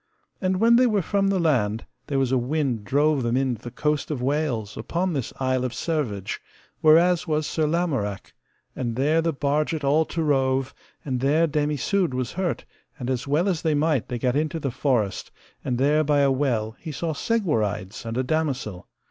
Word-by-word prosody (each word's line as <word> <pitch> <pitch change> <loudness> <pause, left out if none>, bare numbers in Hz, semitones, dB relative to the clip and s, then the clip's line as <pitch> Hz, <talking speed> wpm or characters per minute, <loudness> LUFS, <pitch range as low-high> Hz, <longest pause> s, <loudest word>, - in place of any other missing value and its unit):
And 185 -1 0
when 230 +2 +6
they 250 0 +5
were 210 -5 +1
from 200 +1 +1
the 195 -1 +2
land, 120 - +1 0.2
there 140 - -1
was 135 -2 +1
a 130 - +3
wind 130 -3 -1
drove 145 +5 +2
them 120 +1 0
in 130 -2 +1
to - - -22
the 120 - -7
coast 150 +4 -1
of 150 -4 -2
Wales 125 -5 -1
upon 170 +10 -2
this 135 -6 -3
Isle 130 -1 0
of 125 -2 -2
Servage, 125 - -2 0.4
whereas 170 +3 +4
was 155 -1 0
Sir 155 0 0
Lamorak, 145 - -2 0.4
and 120 -3 -3
there 150 +6 +2
the 165 0 +1
barget 150 +2 -1
all 150 +3 +3
to 165 +1 -3
rove; 135 -2 +1 0.3
and 130 -3 -1
there 145 +5 +3
Dame 150 -1 0
Isoud 165 +1 0
was 130 -1 -2
hurt; 185 -1 -2 0.3
and 130 -2 -3
as 130 +1 -2
well 155 +7 +2
as 180 -5 0
they 160 -2 +1
might 150 -4 +1
they 125 - -3
gat 125 +2 0
into 155 +2 0
the 140 -4 -2
forest, 120 -6 0 0.3
and 125 - -1
there 145 +4 +3
by 145 -1 +2
a 140 -1 +4
well 120 -5 0
he 160 - -6
saw 160 +3 -2
Segwarides 115 - -1
and 115 +1 -4
a 130 - +1
damosel. 130 - -2
145 Hz, 200 wpm, -24 LUFS, 125-160 Hz, 0.4 s, when